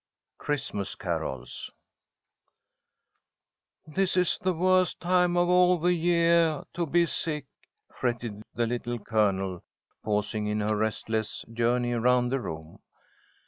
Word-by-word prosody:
CHRISTMAS 135 -9 -3
CAROLS 65 -2 -4 2.2
"THIS 185 +4 0
is 180 -1 +2
the 185 - +1
worst 185 +2 +2
time 180 0 +2
of 175 0 +3
all 180 0 +5
the 175 +2 +2
yeah 170 -2 +3
to 170 -1 -2
be 170 +3 +3
sick," 150 -3 -2 0.5
fretted 120 -4 -3
the 120 - +1
Little 120 +1 -3
Colonel, 100 -4 0 0.4
pausing 105 0 -1
in 105 0 -1
her 105 +1 +1
restless 110 0 -2
journey 120 +1 +1
around 125 +1 +2
the 135 +2 0
room. 80 -7 -7
125 Hz, 115 wpm, -27 LUFS, 110-175 Hz, 2.2 s, all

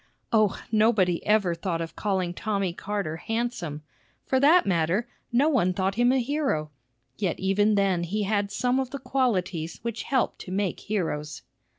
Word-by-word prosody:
O, 215 -3 +3
nobody 215 -6 +3
ever 210 -5 +3
thought 170 0 -3
of 165 0 -5
calling 190 -4 -1
Tommy 200 -2 -1
Carter 195 -5 -3
handsome! 220 -8 -3 0.4
For 260 - +2
that 315 +6 +6
matter, 180 +5 +1 0.2
no 255 +5 +3
one 230 - +2
thought 190 +1 0
him 240 +4 +3
a 265 - +3
hero; 250 - -1 0.5
yet 185 -5 -1
even 205 +2 +2
then 195 -3 +2
he 200 +5 -1
had 205 0 0
some 250 +4 +1
of 260 -2 -2
the 280 - -5
qualities 190 - -1
which 230 -1 -3
help 260 -4 0
to 180 - -8
make 195 -1 -1
heroes. 160 -7 -3
200 Hz, 165 wpm, -26 LUFS, 175-235 Hz, 0.5 s, that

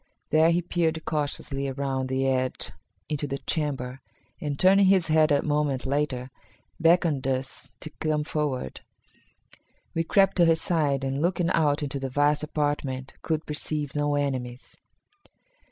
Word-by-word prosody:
There 160 +1 +5
he 170 +1 +2
peered 165 -2 -1
cautiously 145 -2 -2
around 135 -1 -2
the 130 0 0
edge 130 -1 0 0.4
into 145 -1 -2
the 140 0 -3
chamber, 135 -5 -3 0.4
and, 145 -2 -3
turning 195 +3 +5
his 185 -4 +4
head 155 0 +4
a 145 - +3
moment 145 -3 0
later, 135 -2 -1 0.5
beckoned 165 -5 +3
us 130 0 -3
to 155 - -6
come 155 -1 0
forward. 145 - -3 1.1
We 165 - 0
crept 195 +4 +3
to 175 - +6
his 165 -1 +4
side, 145 -6 0
and, 135 +1 -1
looking 175 0 +1
out 150 -2 +2
into 140 -1 -3
the 135 0 -3
vast 145 +2 +2
apartment, 145 -3 -2
could 160 -1 -2
perceive 150 -1 -3
no 145 0 +1
enemies. 130 -3 -3
145 Hz, 145 wpm, -26 LUFS, 135-160 Hz, 1.1 s, to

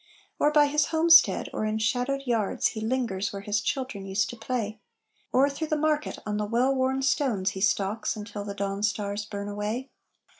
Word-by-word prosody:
Or 295 - +4
by 300 -1 +5
his 295 +1 +2
homestead, 330 0 +5
or - - -2
in 215 0 0
shadowed 250 +5 0
yards 230 -5 +1
He 220 - -6
lingers 220 -5 -1
where 200 0 -7
his 210 +1 0
children 255 -8 -3
used 195 0 0
to - - -8
play; 225 -2 -3 0.5
Or 265 +2 +4
through 285 +3 -4
the 310 - 0
market, 300 0 0
on 210 -1 -2
the 210 - -1
well 245 +5 +2
worn 265 0 0
stones 235 -8 +1
He 190 - -7
stalks 200 +2 0
until 210 -1 -6
the 200 -1 -6
dawn 200 0 -3
stars 205 0 -1
burn 200 -1 -6
away. 210 +6 -4
220 Hz, 190 wpm, -27 LUFS, 205-265 Hz, 0.5 s, by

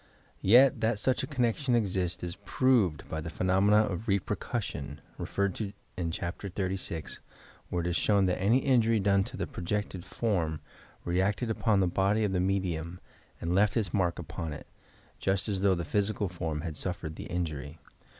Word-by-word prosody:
Yet, 125 +4 +6
that 110 0 +2
such 130 +5 +1
a - - -3
connection 125 -1 +1
exists 95 -6 0
is 85 -1 -4
proved 115 - +2
by 80 - -4
the 85 - -5
phenomena 95 +5 +3
of 105 +1 -4
"repercussion," 100 - -2 0.2
referred 100 -1 -1
to 100 -2 -3 0.2
in 85 -2 -2
Chapter 85 +4 -4
XXXVI, 90 -6 -3 0.5
where 85 -1 -1
it - - -1
was 85 - 0
shown 100 -2 +3
that 90 0 0
any 110 +6 +4
injury 115 -4 +4
done 100 0 +3
to - - -8
the - - -1
projected 95 0 -3
form 85 -10 -1 0.5
reacted 100 +6 +1
upon 110 -3 +2
the 95 - +3
body 100 +5 +2
of 105 - +1
the 95 - +1
medium 90 -2 -1 0.4
and 85 +1 -2
left 100 +4 +3
its 100 -8 -1
mark 90 -4 +1
upon 80 -1 -5
it, - - -9 0.5
just 95 +1 0
as 100 -3 -1
though 100 -1 +4
the 85 -1 -3
physical 100 +4 0
form 80 -4 -3
had 80 -2 -5
suffered 85 -2 -3
the - - -7
injury. 80 -4 -4
95 Hz, 175 wpm, -30 LUFS, 85-105 Hz, 0.5 s, Yet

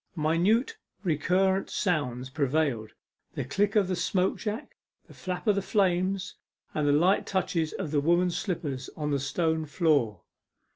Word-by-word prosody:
Minute 190 - +2 0.3
recurrent 190 +3 +1
sounds 130 - -1
prevailed 140 -6 0 0.4
the - - -2
click 200 - 0
of 205 -3 +4
the 185 - -1
smoke 185 +1 0
jack, 220 +5 -5 0.3
the - - -16
flap 180 +2 -5
of 210 - +4
the 200 - 0
flames, 190 -1 0 0.4
and 150 -1 0
the - - +4
light 175 +7 +3
touches 175 -4 0
of 175 -7 -4
the 145 -2 +2
women's 175 +3 +2
slippers 145 -9 -3
upon 150 -2 -4
the 140 - +1
stone 160 +3 0
floor. 145 - +1
170 Hz, 150 wpm, -28 LUFS, 145-190 Hz, 0.4 s, of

